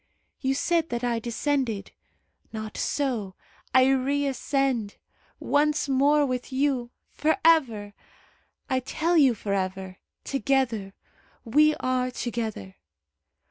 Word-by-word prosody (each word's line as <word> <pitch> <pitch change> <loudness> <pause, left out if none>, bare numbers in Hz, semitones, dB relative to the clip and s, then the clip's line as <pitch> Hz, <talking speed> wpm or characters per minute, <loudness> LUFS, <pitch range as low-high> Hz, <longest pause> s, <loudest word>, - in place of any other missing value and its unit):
You 265 -1 0
said 330 +2 +1
that 240 0 -3
I 240 -1 0
descended. 235 -2 -2 0.6
Not 215 -1 -6
so; 235 -10 -2 0.4
I 260 0 +6
reascend. 270 -4 0 0.4
Once 300 +1 +1
more 285 +2 +3
with 255 0 -3
you! 260 -3 0 0.2
For 315 +4 +1
ever! 230 -11 +3 0.7
I 260 -1 +1
tell 325 +7 -1
you 275 -7 +5
for 200 -1 -3
ever! 190 -1 -3 0.3
Together! 260 -8 -1 0.5
We 300 +6 +4
are 255 0 -1
together! 225 - -5
255 Hz, 105 wpm, -26 LUFS, 225-285 Hz, 0.7 s, I